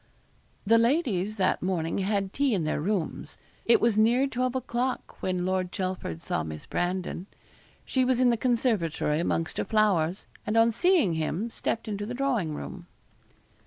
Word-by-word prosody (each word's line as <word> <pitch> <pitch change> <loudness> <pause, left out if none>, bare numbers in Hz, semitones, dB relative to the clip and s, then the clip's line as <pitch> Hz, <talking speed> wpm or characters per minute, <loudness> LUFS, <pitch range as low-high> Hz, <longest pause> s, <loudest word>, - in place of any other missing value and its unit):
The 230 +3 +5
ladies 230 - +1
that 190 -3 +1
morning 175 -1 -1
had 195 0 -1
tea 275 -5 +2
in 180 - 0
their 155 -1 -1
rooms. 190 -1 -2 0.3
It 235 - +5
was 225 -2 +2
near 240 +5 +4
twelve 255 -1 -1
o'clock 255 0 -3
when 185 -1 -1
Lord 185 -1 -1
Chelford 185 - -4
saw - - -1
Miss 80 -1 -7
Brandon. 180 +1 -2 0.6
She 260 - +1
was 255 -1 +2
in 250 -1 +5
the - - +2
conservatory 220 - +1
amongst 165 -1 -1
her - - +1
flowers, 195 -5 +1 0.2
and 210 +2 -1
on 225 +1 +5
seeing 330 - +3
him 165 +8 -2
stepped 230 - -2
into 205 -1 -3
the 245 - -4
drawing 240 - 0
room. - - -8
205 Hz, 165 wpm, -27 LUFS, 180-240 Hz, 0.6 s, The